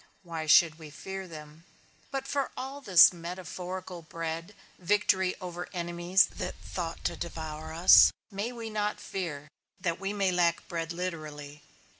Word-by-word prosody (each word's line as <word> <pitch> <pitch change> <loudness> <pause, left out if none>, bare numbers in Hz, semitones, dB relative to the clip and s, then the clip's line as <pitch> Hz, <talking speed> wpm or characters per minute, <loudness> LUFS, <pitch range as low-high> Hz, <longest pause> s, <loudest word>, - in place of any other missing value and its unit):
Why 165 -3 -5
should 160 0 +6
we 155 -2 -10
fear 190 +6 -7
them? 155 -1 -11 0.5
But 270 -1 -3
for 280 -1 -1
all 270 +2 -5
this 185 - +8
metaphorical 180 +1 -6
bread, 165 +3 -5 0.2
victory 190 0 +2
over 180 -1 -6
enemies 175 +1 +2
that - - -4
thought 170 -2 -6
to - - -1
devour 160 -2 -6
us, 170 +3 +8 0.2
may 205 +4 -3
we 230 -2 -7
not 210 0 -1
fear, 155 -6 -5 0.3
that 170 -3 -1
we 195 +1 -2
may 200 -2 +1
lack 170 -2 +1
bread 165 -1 -3
literally? 155 -4 -6
175 Hz, 145 wpm, -29 LUFS, 165-190 Hz, 0.5 s, this